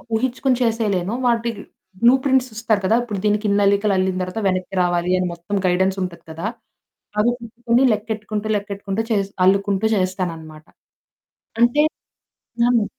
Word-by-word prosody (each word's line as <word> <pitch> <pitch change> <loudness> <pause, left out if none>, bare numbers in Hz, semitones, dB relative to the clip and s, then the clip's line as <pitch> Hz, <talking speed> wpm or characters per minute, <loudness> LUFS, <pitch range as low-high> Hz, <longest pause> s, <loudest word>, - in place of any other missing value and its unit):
ఊహించుకొని 255 +2 0
చేసేయలేను. 215 -4 0
వాటి 235 0 +1 0.5
blue 240 +2 +7
prints 260 -2 +2
ఇస్తారు 220 -2 0
కదా! 220 - +3
ఇప్పుడు 210 -5 -4
దీనికిందల్లికలు 205 -1 +2
అల్లిన 185 0 0
తర్వాత, 185 +5 -4
వెనక్కి 185 +1 -3
రావాలి, 175 0 0
అని 180 - 0
మొత్తం 170 +4 -5
గైడెన్స్ 190 +2 +1
ఉంటది 170 -2 -7
కదా! 165 +6 -4 0.7
అవి 240 +3 +3
పెట్టుకొని 235 +2 0
లెక్కెట్టుకుంటూ, 215 0 -4
లెక్కెట్టుకుంటూ 200 0 -4
చేస్ 200 -2 0
అల్లుకుంటూ 195 +1 +2
చేస్తాననమాట. 165 -5 -3 1.0
అంటే 240 +5 +4 0.9
అవును. 235 -3 +3
205 Hz, 125 wpm, -21 LUFS, 185-225 Hz, 1.0 s, blue